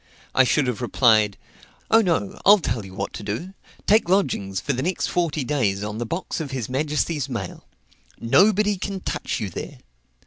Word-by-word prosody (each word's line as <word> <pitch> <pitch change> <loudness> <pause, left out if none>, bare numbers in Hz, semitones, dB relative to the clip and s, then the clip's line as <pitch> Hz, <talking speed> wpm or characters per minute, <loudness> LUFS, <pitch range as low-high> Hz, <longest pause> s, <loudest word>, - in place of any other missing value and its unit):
I 130 - +5
should 145 +3 +2
have 125 -2 -2
replied, 110 -5 +3 0.5
"Oh, 225 +1 +7
no; 165 - -1
I'll 205 +2 +8
tell 115 - -2
you 95 -1 -11
what - - -4
to - - -7
do. 110 - -5 0.3
Take 210 -3 +3
lodgings 125 - +1
for 140 +8 -2
the 130 - -2
next 180 +6 -1
forty 165 -5 -1
days 110 -8 0
on 105 +1 -4
the 120 - -3
box 170 +5 -3
of 155 -4 -4
his 130 -5 -4
majesty's 150 +1 -1
mail. - - -6 0.5
Nobody 200 - +3
can 195 0 -4
touch - - -3
you 105 -5 -4
there. - - -7
135 Hz, 180 wpm, -23 LUFS, 110-180 Hz, 0.5 s, I'll